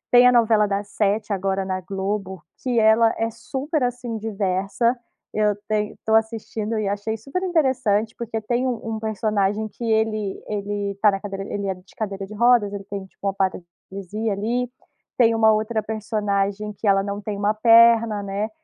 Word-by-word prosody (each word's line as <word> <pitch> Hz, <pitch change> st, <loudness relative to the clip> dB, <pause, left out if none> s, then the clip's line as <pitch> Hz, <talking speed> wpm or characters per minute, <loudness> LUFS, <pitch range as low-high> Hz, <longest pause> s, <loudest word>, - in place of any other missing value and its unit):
tem 245 Hz, -, +8 dB
a 250 Hz, -, +7 dB
novela 225 Hz, -3 st, +4 dB
das 200 Hz, 0 st, -2 dB
7 210 Hz, 0 st, 0 dB
agora 195 Hz, 0 st, -1 dB
na 185 Hz, 0 st, -2 dB
Globo, 195 Hz, 0 st, -4 dB, 0.2 s
que 245 Hz, -3 st, +1 dB
ela 220 Hz, +1 st, +5 dB
é 225 Hz, 0 st, 0 dB
super 270 Hz, +6 st, -3 dB
assim 245 Hz, -2 st, -2 dB
diversa, 205 Hz, +3 st, 0 dB, 0.4 s
eu 210 Hz, -1 st, +2 dB, 0.4 s
estou 220 Hz, 0 st, -1 dB
assistindo 220 Hz, 0 st, -1 dB
e 205 Hz, -, -1 dB
achei 205 Hz, +2 st, -2 dB
super 275 Hz, -, -4 dB
interessante 255 Hz, -, +1 dB
porque 230 Hz, -1 st, -3 dB
tem 240 Hz, +4 st, -1 dB
um 225 Hz, -3 st, -2 dB
um -, -, -4 dB
personagem 215 Hz, -1 st, 0 dB
que 215 Hz, -, -10 dB
ele 220 Hz, -3 st, 0 dB
ele 205 Hz, -1 st, -3 dB
está 200 Hz, +1 st, +3 dB
na 195 Hz, -, -2 dB
cadeira, 195 Hz, -1 st, -5 dB
ele 200 Hz, -1 st, -2 dB
é 190 Hz, -, 0 dB
de 180 Hz, +1 st, -19 dB
cadeira 200 Hz, -4 st, -4 dB
de 200 Hz, -, -11 dB
rodas, 235 Hz, -2 st, +4 dB
ele 200 Hz, -1 st, -6 dB
tem 200 Hz, -1 st, -6 dB
tipo 195 Hz, +1 st, -7 dB
uma 195 Hz, -, 0 dB
paralisia 195 Hz, +3 st, -4 dB
ali, 235 Hz, +5 st, -1 dB, 0.5 s
tem 230 Hz, -2 st, +4 dB
um 225 Hz, -, -1 dB
outra 220 Hz, 0 st, +2 dB
personagem 210 Hz, -1 st, -1 dB
que 205 Hz, -, -5 dB
ela 195 Hz, 0 st, +4 dB
não 200 Hz, 0 st, -4 dB
tem 205 Hz, 0 st, -4 dB
uma 205 Hz, +1 st, +1 dB
perna 230 Hz, -1 st, +5 dB
né, 200 Hz, +2 st, -2 dB
215 Hz, 175 wpm, -23 LUFS, 200-225 Hz, 0.5 s, tem